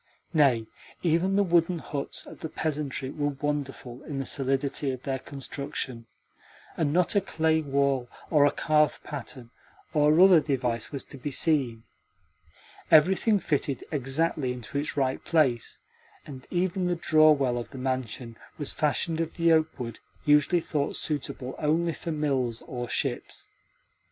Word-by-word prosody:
Nay, 135 Hz, -8 st, +4 dB, 0.4 s
even 175 Hz, +3 st, +2 dB
the 200 Hz, -, +4 dB
wooden 170 Hz, -1 st, +2 dB
huts 145 Hz, -3 st, -5 dB
of -, -, -12 dB
the 160 Hz, -, -5 dB
peasantry 145 Hz, -4 st, -3 dB
were 145 Hz, -2 st, -2 dB
wonderful 135 Hz, -4 st, -3 dB
in 145 Hz, -4 st, -5 dB
the 135 Hz, -, -3 dB
solidity 135 Hz, +2 st, 0 dB
of 130 Hz, -1 st, -4 dB
their 135 Hz, -1 st, -2 dB
construction, 135 Hz, -3 st, -5 dB, 0.7 s
and 150 Hz, -3 st, 0 dB
not 180 Hz, +5 st, +2 dB
a 200 Hz, -, +5 dB
clay 160 Hz, -3 st, +1 dB
wall 140 Hz, -3 st, 0 dB, 0.2 s
or 150 Hz, -3 st, +5 dB
a -, -, +2 dB
carved 150 Hz, 0 st, +2 dB
pattern 130 Hz, -4 st, -7 dB, 0.4 s
or 150 Hz, +1 st, +4 dB
other 185 Hz, -2 st, +8 dB
device 125 Hz, -6 st, -2 dB
was 140 Hz, -3 st, -4 dB
to 140 Hz, -, -12 dB
be 145 Hz, -, -3 dB
seen. 130 Hz, -6 st, +1 dB, 1.1 s
Everything 190 Hz, +7 st, +5 dB
fitted 140 Hz, -6 st, -1 dB
exactly 140 Hz, 0 st, 0 dB
into 125 Hz, +3 st, -4 dB
its 150 Hz, 0 st, -4 dB
right 130 Hz, -2 st, 0 dB
place, 135 Hz, -9 st, +1 dB, 0.5 s
and 130 Hz, -3 st, -10 dB
even 180 Hz, 0 st, 0 dB
the 175 Hz, -, +1 dB
draw 155 Hz, -2 st, +5 dB
well 130 Hz, -5 st, +1 dB
of 120 Hz, -, -7 dB
the 135 Hz, -, -10 dB
mansion 125 Hz, -2 st, -3 dB, 0.2 s
was 145 Hz, -, -3 dB
fashioned 160 Hz, +2 st, 0 dB
of 165 Hz, 0 st, -4 dB
the 170 Hz, -1 st, +4 dB
oakwood 155 Hz, -8 st, 0 dB, 0.3 s
usually 150 Hz, +4 st, +4 dB
thought 145 Hz, -3 st, -2 dB
suitable 135 Hz, -3 st, -3 dB
only 165 Hz, +2 st, +1 dB
for 165 Hz, -, -5 dB
mills 135 Hz, -6 st, -1 dB
or 120 Hz, -2 st, -5 dB
ships. 125 Hz, 0 st, -2 dB
145 Hz, 150 wpm, -27 LUFS, 130-160 Hz, 1.1 s, other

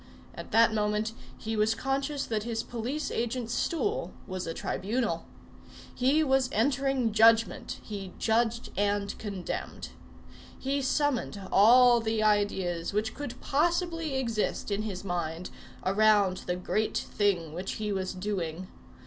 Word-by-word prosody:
At -, -, -8 dB
that 230 Hz, 0 st, +5 dB
moment 210 Hz, +1 st, 0 dB, 0.3 s
he 225 Hz, 0 st, -4 dB
was 215 Hz, +1 st, +2 dB
conscious 275 Hz, +3 st, -1 dB
that 220 Hz, -2 st, -1 dB
his 225 Hz, 0 st, -3 dB
police 245 Hz, +6 st, -3 dB
agent's 235 Hz, 0 st, -2 dB
stool 410 Hz, +6 st, -1 dB
was 185 Hz, -3 st, -5 dB
a 165 Hz, -, -2 dB
tribunal. 210 Hz, -4 st, -2 dB, 0.7 s
He 275 Hz, +5 st, +3 dB
was 265 Hz, -3 st, +2 dB
entering 265 Hz, 0 st, +1 dB
judgment. 225 Hz, +1 st, +4 dB
He 195 Hz, -3 st, -6 dB
judged 230 Hz, +1 st, +1 dB
and 205 Hz, 0 st, 0 dB
condemned. 200 Hz, -4 st, -5 dB, 0.7 s
He 275 Hz, +1 st, -1 dB
summoned 265 Hz, -5 st, 0 dB
all 240 Hz, +4 st, +7 dB
the 220 Hz, -1 st, 0 dB
ideas 195 Hz, -5 st, +1 dB
which 215 Hz, +2 st, 0 dB
could 255 Hz, -3 st, -6 dB
possibly 330 Hz, 0 st, 0 dB
exist 230 Hz, -5 st, -1 dB
in 200 Hz, +1 st, 0 dB
his 200 Hz, -4 st, -5 dB
mind, 175 Hz, -2 st, -3 dB, 0.3 s
around 200 Hz, -1 st, +4 dB
the 180 Hz, -, 0 dB
great 215 Hz, +4 st, -1 dB
thing 180 Hz, -7 st, 0 dB
which 180 Hz, +3 st, -4 dB
he 210 Hz, -1 st, -3 dB
was 190 Hz, -1 st, -3 dB
doing. 185 Hz, -3 st, -3 dB
220 Hz, 130 wpm, -29 LUFS, 200-250 Hz, 0.7 s, all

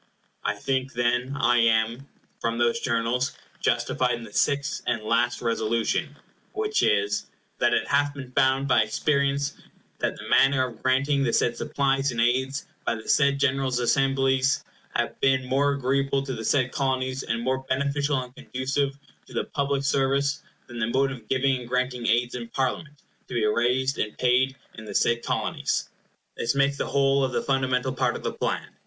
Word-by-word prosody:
I 105 Hz, -, 0 dB
think, 130 Hz, +4 st, -2 dB
then, 125 Hz, +3 st, 0 dB
I 120 Hz, 0 st, +4 dB
am, 115 Hz, +3 st, +2 dB, 0.3 s
from 115 Hz, 0 st, -1 dB
those 120 Hz, 0 st, +2 dB
Journals, 125 Hz, +2 st, -1 dB, 0.2 s
justified 125 Hz, -1 st, +1 dB
in 115 Hz, -, -8 dB
the 105 Hz, -2 st, -11 dB
sixth 140 Hz, +7 st, 0 dB
and 115 Hz, -3 st, 0 dB
last 120 Hz, +3 st, +1 dB
Resolution, 115 Hz, 0 st, 0 dB, 0.4 s
which 425 Hz, 0 st, 0 dB
is— 105 Hz, 0 st, +1 dB, 0.3 s
"That -, -, +3 dB
it -, -, 0 dB
hath 145 Hz, 0 st, +1 dB
been 130 Hz, -3 st, -8 dB
found 130 Hz, +2 st, +2 dB
by -, -, +4 dB
experience 140 Hz, +5 st, 0 dB, 0.5 s
that -, -, -1 dB
the -, -, -9 dB
manner 135 Hz, -1 st, +4 dB
of 120 Hz, -3 st, -9 dB
granting 140 Hz, +2 st, +2 dB
the 125 Hz, -4 st, +1 dB
said 120 Hz, 0 st, +2 dB
supplies 135 Hz, +2 st, 0 dB
and 115 Hz, -, -4 dB
aids, 130 Hz, +4 st, +1 dB, 0.2 s
by 115 Hz, -, 0 dB
the 110 Hz, -, -10 dB
said 140 Hz, -1 st, +3 dB
General 135 Hz, -1 st, +1 dB
Assemblies, 135 Hz, +2 st, +2 dB, 0.3 s
hath 120 Hz, -, -2 dB
been 135 Hz, -1 st, +3 dB
more 140 Hz, +2 st, +2 dB
agreeable 135 Hz, 0 st, 0 dB
to 135 Hz, -1 st, -4 dB
the 115 Hz, -2 st, -5 dB
said 130 Hz, -1 st, +2 dB
Colonies, 130 Hz, -1 st, -1 dB
and 115 Hz, -2 st, -2 dB
more 130 Hz, +2 st, 0 dB
beneficial 140 Hz, +1 st, 0 dB
and 125 Hz, 0 st, -8 dB
conducive 135 Hz, +2 st, -2 dB, 0.3 s
to -, -, -14 dB
the -, -, 0 dB
public 140 Hz, -1 st, -1 dB
service, 140 Hz, +1 st, +1 dB, 0.2 s
than 120 Hz, -1 st, -8 dB
the 110 Hz, -, 0 dB
mode 135 Hz, +3 st, +1 dB
of 120 Hz, -5 st, -9 dB
giving 135 Hz, 0 st, +2 dB
and 120 Hz, -1 st, -10 dB
granting 125 Hz, -1 st, -1 dB
aids 120 Hz, +2 st, +2 dB
in 120 Hz, -2 st, -5 dB
Parliament, 140 Hz, +4 st, -3 dB, 0.3 s
to -, -, -7 dB
be 115 Hz, -2 st, +2 dB
raised 125 Hz, +5 st, +1 dB
and 105 Hz, -, -2 dB
paid 130 Hz, +1 st, +2 dB, 0.2 s
in 110 Hz, -, -10 dB
the -, -, -7 dB
said 120 Hz, 0 st, +2 dB
Colonies." -, -, -1 dB, 0.5 s
This 120 Hz, +4 st, -1 dB
makes 140 Hz, 0 st, +2 dB
the -, -, -1 dB
whole 140 Hz, 0 st, +2 dB
of 130 Hz, -2 st, -1 dB
the -, -, 0 dB
fundamental 130 Hz, -1 st, 0 dB
part 125 Hz, -2 st, 0 dB
of -, -, -7 dB
the -, -, -2 dB
plan. -, -, -2 dB
130 Hz, 180 wpm, -25 LUFS, 120-140 Hz, 0.5 s, I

